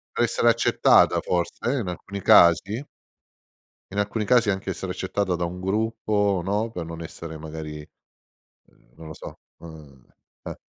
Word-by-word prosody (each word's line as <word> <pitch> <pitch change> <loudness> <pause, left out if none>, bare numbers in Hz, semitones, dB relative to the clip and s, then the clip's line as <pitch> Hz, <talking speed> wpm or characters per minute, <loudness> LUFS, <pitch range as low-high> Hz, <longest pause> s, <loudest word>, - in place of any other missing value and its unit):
Essere 120 0 +2
accettata, 115 0 +4
forse, 90 +7 -2
in 120 -9 -2
alcuni 100 +2 -6
casi? 100 - +5 1.1
In 100 - -2
alcuni 105 +1 -1
casi 120 -1 +3
anche 95 -1 -2
essere - - -5
accettata 95 -3 -2
da 85 0 -2
un 90 +2 -6
gruppo 105 -1 0
no, 105 +4 -1
per 85 -5 -5
non 85 0 -8
essere 80 0 -8
magari 75 -1 -8 0.8
uhm - - -30
non 80 - -11
lo 80 - -7
so - - -10 0.2
uhm, 75 -6 -14 0.4
eh. - - -6
95 Hz, 145 wpm, -24 LUFS, 80-105 Hz, 1.1 s, casi